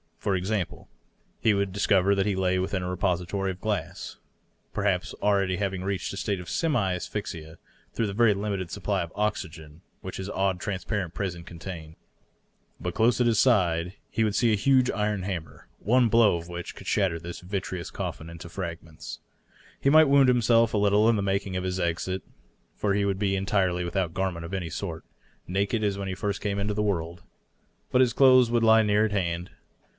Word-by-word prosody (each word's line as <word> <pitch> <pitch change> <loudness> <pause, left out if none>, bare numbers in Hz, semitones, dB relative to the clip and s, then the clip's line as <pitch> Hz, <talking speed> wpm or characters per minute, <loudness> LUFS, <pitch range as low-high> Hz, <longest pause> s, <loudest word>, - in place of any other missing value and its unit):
For 100 - 0
example, 95 0 -2 0.5
he 110 -2 +3
would 100 -1 0
discover 100 0 +3
that 100 +1 +1
he 100 - +1
lay 95 -1 +1
within 95 0 -1
a 90 - -3
repository 90 +1 -1
of 90 - -10
glass, 105 -2 -3 0.5
perhaps 100 -3 0
having - - -13
already 100 -1 +1
reached 95 -1 -3
a - - -6
state 100 -2 -1
of 90 - -8
semi 120 - +1
asphyxia 85 -4 -5 0.4
through 115 - 0
the 100 - -4
very 115 0 +4
limited 100 -3 -3
supply - - -1
of 85 -2 -5
oxygen 80 -7 -3 0.2
which 95 - -6
his 95 +1 -5
odd, 95 -2 0
transparent 95 -2 -3
prison 90 -4 -3
con 85 - -11
tained. 80 -3 -8 0.8
But 90 - -3
close 115 +1 +3
at 125 - +3
his 115 -2 +3
side 90 -8 +3 0.2
he 115 - 0
would 105 -1 0
see 120 -2 +3
a - - +4
huge 130 +4 +3
iron 105 -2 -1
hammer, 90 -4 -6
one 120 +3 +3
blow 115 -3 +5
of 85 0 -6
which 85 0 -7
could - - -11
shatter 95 -5 +1
this 85 +1 -7
vitreous 95 -1 -4
coffin 80 - -5
into 85 +1 -9
fragments. 85 -3 -7 0.6
He 135 - +2
might 155 +1 +8
wound 140 -2 +6
himself 115 -2 +4
a - - +2
little 105 +2 +4
in 110 -4 +2
making 100 -1 -1
his 90 0 -2
exit, 90 +2 -1 0.5
for 100 -1 0
he 100 0 +1
would 100 -1 -1
be 100 -1 +1
en 95 - -2
tirely 95 -5 +1
without 85 -1 -2
garment 90 -3 -2
of 85 - -8
any 90 -4 -2
sort, - - -5 0.4
naked 100 +4 0
as 100 -1 0
when 100 -1 -4
he 95 - -3
first 100 +1 -3
came 100 -1 -1
into 105 +1 -1
the 105 - 0
world. 85 -4 -2 0.7
But 125 - +4
his 125 -2 +3
clothes 130 -3 +6
would 120 -1 +2
lie 110 0 +6
near 105 +1 +3
at 110 - -2
hand. 90 -3 -2
95 Hz, 195 wpm, -27 LUFS, 90-105 Hz, 0.8 s, might